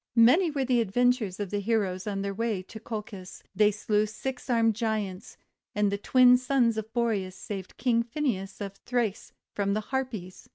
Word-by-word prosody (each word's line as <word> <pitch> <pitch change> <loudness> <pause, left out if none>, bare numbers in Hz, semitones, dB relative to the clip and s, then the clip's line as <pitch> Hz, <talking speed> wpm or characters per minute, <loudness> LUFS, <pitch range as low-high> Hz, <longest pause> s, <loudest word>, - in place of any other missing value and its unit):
Many 255 +10 +6
were 280 -3 -1
the 245 -2 +3
adventures 230 -2 +1
of 205 -3 -4
the 205 - 0
heroes 200 -3 -1
on 195 -1 -2
their 200 0 -2
way 220 -3 -2
to 220 - -10
Colchis. 210 -4 -7
They 210 +1 +5
slew 210 0 0
six 255 +5 -6
armed 230 -2 +3
Giants, 215 -4 -3 0.4
and 205 -1 +2
the 200 - -2
Twin 250 +3 +6
Sons 250 -3 +2
of 220 0 -5
Boreas 215 -6 -1
saved 195 -2 -7
King 235 -3 +2
Phineas 230 -6 -3
of 200 -1 -6
Thrace 235 -5 -2 0.2
from 200 0 0
the - - +1
Harpies. 235 -9 -4
220 Hz, 175 wpm, -28 LUFS, 200-245 Hz, 0.4 s, Many